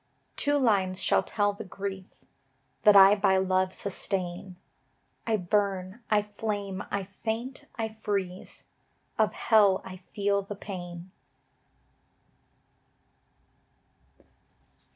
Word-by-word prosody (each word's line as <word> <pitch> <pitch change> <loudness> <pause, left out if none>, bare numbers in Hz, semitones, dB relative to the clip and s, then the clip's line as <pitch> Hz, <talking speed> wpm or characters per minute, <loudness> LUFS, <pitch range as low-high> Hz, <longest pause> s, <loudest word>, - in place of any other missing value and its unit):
Two 290 0 +2
lines 195 -8 +2
shall 190 - +3
tell 205 -1 0
the 200 - -8
grief 195 0 -6 0.8
That 210 -1 +8
I 195 0 +9
by 190 -2 +3
love 185 0 +1
sustain: 185 -2 -4 0.7
I 220 -1 +2
burn, 195 +2 -1
I 210 -1 +3
flame, 205 -2 -4
I 200 - -2 0.2
faint, 235 +4 -3
I 225 -1 -2
freeze, 200 -4 -4 0.5
Of - - +3
Hell 205 -4 +4
I 185 0 -8
feel 200 -1 +1
the 200 +1 -7
pain. 180 -3 -8
200 Hz, 100 wpm, -28 LUFS, 185-210 Hz, 0.8 s, I